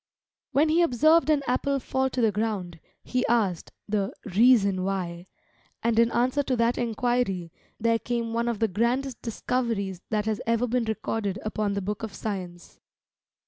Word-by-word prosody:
When 290 +4 +3
he 330 +3 +4
observed 315 +2 +4
an 295 -2 +3
apple 275 +3 0
fall 265 +1 0
to 255 - -2
the 225 -2 +4
ground, 200 -5 -3 0.2
he 255 0 -1
asked 205 -8 0 0.2
the 205 -1 0 0.2
"Reason 200 -5 +5
Why;" 180 -2 -3 0.6
and 230 0 +2
in 230 0 +5
answer 255 +5 +2
to 270 -2 -1
that 235 0 +1
enquiry, 235 -7 0 0.3
there 230 0 +2
came 235 -1 -2
one 235 +1 0
of 235 -2 -1
the 225 - +2
grandest 235 +6 -1
discoveries 225 -5 -2
that 210 -1 0
has 220 -1 -1
ever 230 +1 +2
been 245 0 0
recorded 220 -2 -2
upon 215 -1 -1
the 200 - -2
book 210 +2 -3
of 220 -3 -6
science. 180 -5 -6
230 Hz, 165 wpm, -26 LUFS, 200-245 Hz, 0.6 s, Reason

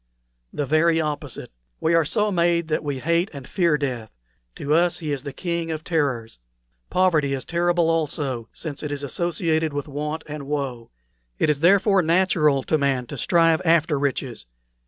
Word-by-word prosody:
"The 145 - -2
very 160 +3 +3
opposite. 150 -2 -4 0.3
We 165 - +1
are 165 -2 +4
so 210 +6 +1
made 170 -2 +1
that 155 - 0
we 145 -2 -2
hate 170 +7 +1
and 135 -3 -9
fear 170 -5 +2
death; 125 -6 -3 0.5
to 145 - -1
us 170 +2 +3
he 155 -3 -4
is 140 - -3
the 140 0 -6
King 170 +3 -3
of 155 -1 -4
Terrors. 135 - -1 0.5
Poverty 160 -7 +2
is 130 - -6
terrible 175 0 +1
also, 145 -7 -1
since 150 -4 -6
it 150 - -4
is 145 0 -4
associated 160 +1 0
with 145 0 -3
want 150 +2 -4
and 150 -2 -7
woe; 135 -5 -3 0.5
it 150 - +2
is, 145 - -2
therefore, 195 +3 +4
natural 165 -5 +2
to 155 - +1
man 135 -3 0
to - - -8
strive 165 -2 +3
after 160 -3 +3
riches. 130 - -3
155 Hz, 175 wpm, -23 LUFS, 140-170 Hz, 0.5 s, are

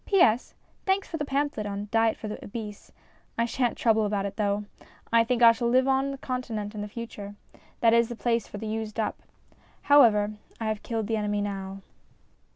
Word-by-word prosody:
P.S. 250 - +3 0.3
Thanks 385 0 +1
for 325 - -4
the 295 - -2
pamphlet 280 -6 -1
on 200 0 -4
Diet 225 0 +3
for 215 - -6
the 210 - -6
Obese; 210 -1 -7 0.5
I 230 - +2
shan't 240 0 -1
trouble 220 -2 +3
about 205 -1 0
it 200 0 -4
though. 205 -1 0 0.5
I 230 0 +6
think 240 +1 +1
I 230 - +10
shall 235 +1 -1
live 255 +2 +4
on 270 +1 +2
the 275 - -5
Continent 235 -6 -4
in 210 -1 -4
future: 210 -2 -7 0.5
that 230 -1 +5
is 235 0 +4
the 240 - -5
place 230 -1 0
for - - -8
the 220 - -6
used 220 0 -4
up. 220 - -2 0.6
However, 215 -8 +5 0.3
I 220 -1 -1
have 215 -1 -2
killed 225 -3 -2
the 220 +1 -1
enemy 205 -1 -1
now. 195 -1 -5
225 Hz, 195 wpm, -27 LUFS, 210-240 Hz, 0.6 s, I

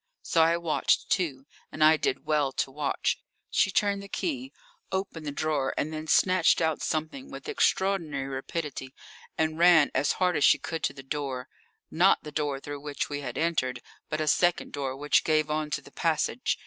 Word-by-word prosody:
So 165 - +2
I 165 +1 +4
watched, 170 -2 0
too, 140 -8 0 0.3
and 155 - 0
I 155 +1 +7
did 140 - -2
well 150 -3 +1
to 135 - -1
watch. 145 +1 -1 0.3
She - - +3
turned 200 +1 +1
the 200 - -9
key, 270 - -3 0.4
opened 190 -5 -3
the - - -2
drawer, 145 -2 -1
and 155 +2 -1
then 155 0 -5
snatched 185 +2 +4
out 160 -2 0
something 160 - -3
with - - -9
extraordinary 190 - 0
rapidity 135 0 -5 0.4
and 160 0 0
ran 170 -4 +6
as 145 - +2
hard 180 -2 +1
as 145 - +1
she - - +6
could 165 -1 -5
to - - -1
the 135 -1 -11
door 135 -2 -4 0.4
not 180 +4 +4
the 150 - -8
door 145 -2 -2
through 145 0 -7
which 145 -1 -3
we 145 0 -4
had 125 -2 -5
entered, 150 -7 0 0.3
but 155 - -2
a 155 - 0
second 175 +3 +2
door 135 -2 -3
which 145 +1 +2
gave 155 -1 +1
on 155 0 -1
to 140 -1 -3
the - - -15
passage. 165 +9 0
155 Hz, 190 wpm, -27 LUFS, 140-170 Hz, 0.4 s, I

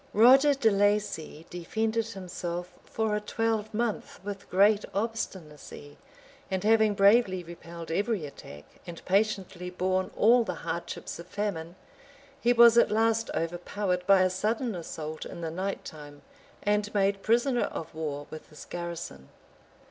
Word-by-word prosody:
Roger 265 +6 +7
de 225 -5 +3
Laci 200 -6 0
defended 220 +6 -1
himself 180 -3 -5
for 220 -1 -1
a 210 - -1
twelvemonth 220 0 -2
with 200 0 -7
great 205 +3 +4
obstinacy; 180 -9 -5 0.5
and 190 -1 -2
having 220 -1 +4
bravely 200 -2 +4
repelled 170 -1 -9
every 205 -1 0
attack, 75 - -11 0.2
and 170 -1 -9
patiently 190 -3 0
borne 185 +1 -1
all 235 +2 +5
the 180 -5 -4
hardships 170 +1 -5
of 170 - -9
famine, 180 -5 -4 0.7
he 240 - +3
was 235 -1 +7
at - - +4
last 225 +1 +1
overpowered 180 +2 -2
by 195 -1 +6
a 185 - +3
sudden 220 +5 -1
assault 160 -3 -6
in 170 - -8
the 165 -1 -3
night 190 +4 -4
time, 145 -2 -11 0.4
and 210 0 +1
made 195 0 +2
prisoner 240 +3 +2
of 160 - -6
war, 150 -2 -4
with 155 - -10
his 150 - -12
garrison. 170 - -7
195 Hz, 140 wpm, -28 LUFS, 170-220 Hz, 0.7 s, Roger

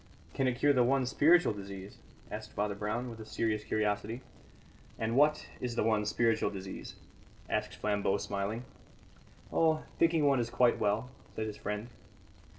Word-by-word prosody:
"Can 135 - +1
it 125 - +2
cure 145 +2 +4
the 125 -2 +4
one 130 +1 +2
spiritual 160 +3 +4
disease?" 100 -1 -8 0.3
asked 110 0 -6
Father 105 0 -1
Brown, 105 +5 -2
with 115 - -10
a - - -6
serious 110 -2 -1
curiosity. 105 +3 -1 0.8
"And 115 +1 -1
what 150 +2 +4
is 125 -2 -3
the - - +1
one 110 -1 +2
spiritual 115 -1 +2
disease?" 95 -1 -7 0.5
asked - - -1
Flambeau, 100 -1 +1
smiling. 100 +5 -3 0.9
"Oh, 160 -1 +3 0.2
thinking 165 -2 +4
one 140 -3 +4
is 115 -1 -1
quite 120 -1 +3
well," 110 +4 0 0.2
said 110 - -2
his 105 -1 -5
friend. 105 +3 -4
110 Hz, 155 wpm, -32 LUFS, 105-125 Hz, 0.9 s, cure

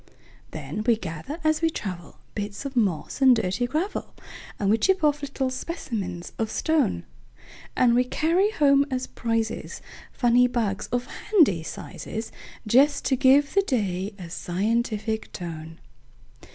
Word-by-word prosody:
Then 215 - -5
we 235 - +6
gather 190 - -6
as 310 0 +2
we 330 - +3
travel, 180 - -6 0.2
Bits 205 +4 -5
of 275 -1 -5
moss 200 - 0
and 260 -2 +7
dirty 225 +2 0
gravel, 320 +10 -3 0.4
And 200 -1 +1
we 225 - +3
chip 380 - +2
off 295 -1 +3
little 270 -2 -2
specimens 220 - -5
of 220 -1 0
stone; 315 +2 +1 0.7
And 245 -2 +4
we 245 +1 +4
carry 335 +10 +2
home 280 -7 +4
as 255 -1 -2
prizesFunny 235 +2 -1
bugs, 215 -4 -1
of 245 0 -1
handy 315 - +2
sizes, 220 +6 -6 0.3
Just 275 +6 +4
to 265 - +3
give 275 +3 +4
the 395 - +5
day 200 - -1
a 175 -4 -9
scientific 220 +4 -1
tone. 160 -2 -7
240 Hz, 140 wpm, -25 LUFS, 200-280 Hz, 0.7 s, and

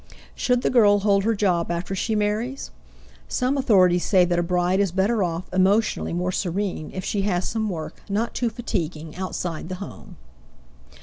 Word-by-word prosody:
Should 250 -1 0
the - - +1
girl 205 -5 +5
hold 200 -1 +2
her 225 0 +2
job 180 -5 +1
after 175 +2 -3
she 220 +3 -1
marries? 215 +6 -2 0.6
Some 255 +2 0
authorities 185 -10 +4
say 185 -3 +4
that 175 0 0
a - - +3
bride 180 +2 +1
is 200 -3 +2
better 200 +5 +1
off, 170 -1 -1
emotionally 195 +4 +2
more 180 +2 -1
serene, 185 -3 -2
if 185 - -5
she 205 - -1
has 185 -3 0
some 220 -1 -2
work 160 -4 -6
not 215 +4 -1
too 240 -1 0
fatiguing 165 -9 -4
outside 180 -2 -4
the 185 - -3
home. 200 +2 -10
195 Hz, 175 wpm, -23 LUFS, 175-215 Hz, 0.6 s, girl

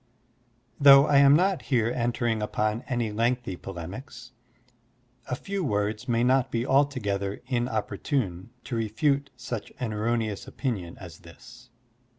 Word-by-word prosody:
Though 140 -1 +8
I 145 -2 +3
am 140 0 +7
not 185 +2 +2
here 120 -4 +1
entering 120 -2 -1
upon 105 +1 -1
any 120 -4 -1
lengthy 115 -2 -1
polemics, 100 - -9 1.0
a 125 - -2
few 195 +7 -4
words 105 -4 -1
may 120 0 +2
not 130 +1 +3
be 120 0 -1
altogether 105 -9 0
inopporttme 120 - -2
to 125 - -5
refute 140 +6 0
such 120 -3 -6
an 115 -4 -3
erroneous 110 -1 -2
opinion 100 -11 -4
as 85 -4 -11
this. 115 +8 -15
120 Hz, 130 wpm, -26 LUFS, 105-135 Hz, 1.0 s, Though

